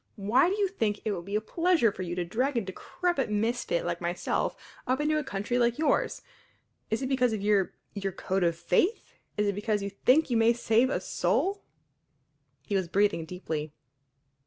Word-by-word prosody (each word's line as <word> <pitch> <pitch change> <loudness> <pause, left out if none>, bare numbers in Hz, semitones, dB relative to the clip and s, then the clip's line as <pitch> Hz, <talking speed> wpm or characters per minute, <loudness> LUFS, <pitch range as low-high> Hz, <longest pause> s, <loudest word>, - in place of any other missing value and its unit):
Why 225 - +3
do 395 - -1
you 405 -1 +2
think 220 - -1
it 215 - +1
would 175 -4 -4
be 200 +1 -4
a 210 - +2
pleasure 330 - +2
for 190 - -8
you 175 -1 -3
to 180 -1 -2
drag 250 +9 0
a - - +2
decrepit 270 - -2
misfit 240 - 0
like - - -2
myself - - -1 0.3
up 255 +2 +1
into 305 +1 +1
a - - -3
country 240 -1 -2
like 235 0 +2
yours? 305 -2 +1 0.7
Is 220 +5 -1
it - - -1
because 250 -3 +2
of 215 - -3
your 205 -2 +2 0.2
your 195 -1 -3
code 190 +1 -1
of 170 -1 +2
faith? 180 - 0 0.2
Is 210 - +2
it 200 - +1
because 210 0 -1
you 200 - -4
think 255 +8 +3
you 235 - +3
may 225 +1 +5
save 235 +1 +2
a - - 0
soul?" 395 +1 0 1.0
He - - -4
was 190 -2 0
breathing 190 -2 +1
deeply. 160 -3 -5
220 Hz, 195 wpm, -28 LUFS, 195-270 Hz, 1.0 s, may